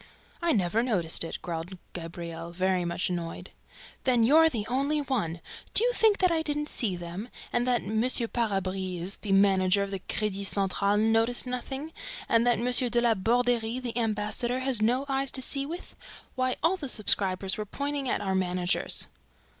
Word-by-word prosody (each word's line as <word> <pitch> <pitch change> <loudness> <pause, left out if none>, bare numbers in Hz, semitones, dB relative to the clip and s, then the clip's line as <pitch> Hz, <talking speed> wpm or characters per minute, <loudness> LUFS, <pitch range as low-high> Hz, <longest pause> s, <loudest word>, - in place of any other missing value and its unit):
"I 340 -1 +2
never 210 - +1
noticed 185 -12 0
it," 165 - -5
growled 170 +2 -5 0.2
Gabriel, 170 -1 -7
very 185 0 0
much 170 +1 -2
annoyed. 170 -2 -5 0.5
"Then 245 -3 +3
you're 315 +7 +6
the 225 -8 -3
only 275 +5 0
one!... 215 - -2 0.3
Do - - +5
you - - +2
think 440 -3 +4
that 365 -2 +3
I 325 -1 +1
didn't 295 -1 -2
see 205 -6 0
them?... 175 +6 -7 0.2
And 240 +1 +1
that 245 -2 +1
M. 220 +1 -1
Parabise, 195 -7 0
the 205 - -4
manager 195 0 +4
of 200 - -5
the 195 - -3
Credit 200 +1 -3
Central, 200 +1 +1
noticed 225 +3 +2
nothing?... 265 +5 -5 0.3
And 230 +1 +3
that 240 - +3
M. 245 +1 +4
de 240 - +2
La 235 -1 +3
Borderie, 235 +2 +1
the 240 -3 -5
ambassador, 230 +2 -1
has 260 -4 0
no 250 +5 +2
eyes 270 0 -1
to 260 - 0
see 275 +2 +2
with?... 345 +4 -8 0.4
Why, 255 0 0
all 360 +3 +3
the 290 -7 -6
subscribers 195 -3 +2
were 210 - -3
pointing 280 +3 -3
at - - 0
our 190 - -1
managers!" 180 0 0
225 Hz, 175 wpm, -28 LUFS, 190-255 Hz, 0.5 s, you're